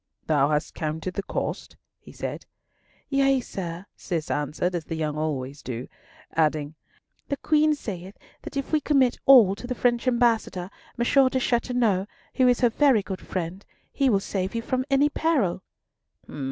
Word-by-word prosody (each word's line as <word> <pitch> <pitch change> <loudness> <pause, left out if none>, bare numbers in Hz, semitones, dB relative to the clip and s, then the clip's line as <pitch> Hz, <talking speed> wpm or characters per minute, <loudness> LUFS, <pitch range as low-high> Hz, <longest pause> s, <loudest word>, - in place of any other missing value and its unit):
"Thou 145 -2 +3
hast 150 +1 -1
counted 160 +3 -3
the 200 - -2
cost?" - - -4 0.2
he - - -14
said. - - -6 0.6
"Yea, 275 -1 +3
sir," 180 -6 -6
Cis 165 -4 -3
answered, 150 +5 -1
as 170 -3 -3
the 165 - -4
young 155 -2 -2
always 145 -3 -3
do; 125 0 -5 0.5
adding, 155 -2 +1 0.5
"the 280 - -2
Queen 305 +1 +3
saith 190 -7 -7 0.2
that - - -7
if 275 - -3
we 310 -1 +2
commit 270 -5 +2
all 240 -8 +8
to 235 +4 -8
the 250 - -3
French 240 +1 +1
Ambassador, 230 -7 +1 0.3
M. 265 +3 +4
De 260 - 0
Chateauneuf, 235 -6 +1 0.3
who 260 -2 +3
is 245 0 +3
her 245 - +5
very 250 -3 +3
good 190 -1 -6
friend, 185 +2 -4 0.3
he 275 -2 +2
will 200 -4 +3
save 195 +1 -3
you 230 - -2
from 255 +1 -1
any 275 +1 +4
peril." 290 - 0
205 Hz, 165 wpm, -25 LUFS, 165-260 Hz, 0.6 s, all